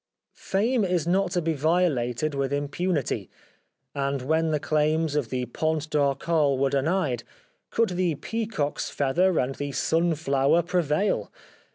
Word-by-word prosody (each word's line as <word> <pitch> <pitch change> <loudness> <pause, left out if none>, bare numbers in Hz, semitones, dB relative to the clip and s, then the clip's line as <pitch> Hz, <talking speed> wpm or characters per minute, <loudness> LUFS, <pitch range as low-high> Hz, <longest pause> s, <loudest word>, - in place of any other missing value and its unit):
Fame 225 +4 0
is 180 -4 0
not 190 +2 +2
to 175 -3 0
be 165 0 +1
violated 155 -3 +1
with 140 -1 -1
im 145 0 -1
punity; 170 -2 -1 0.6
and 140 -2 -2
when 160 +4 +1
the 155 -1 +1
claims 155 +1 +1
of 140 -7 0
the 125 -1 -2
Pont 155 +5 -2
d' - - -3
Arcole 140 0 +2
were 135 0 +1
denied, 140 -4 0 0.5
could 230 -1 +1
the 180 -3 0
peacock's 205 -2 -3
feather 170 +6 +1
and 130 +2 0
the 145 +1 -4
sunflower 155 0 +2
prevail 175 +2 0
155 Hz, 145 wpm, -26 LUFS, 140-175 Hz, 0.6 s, not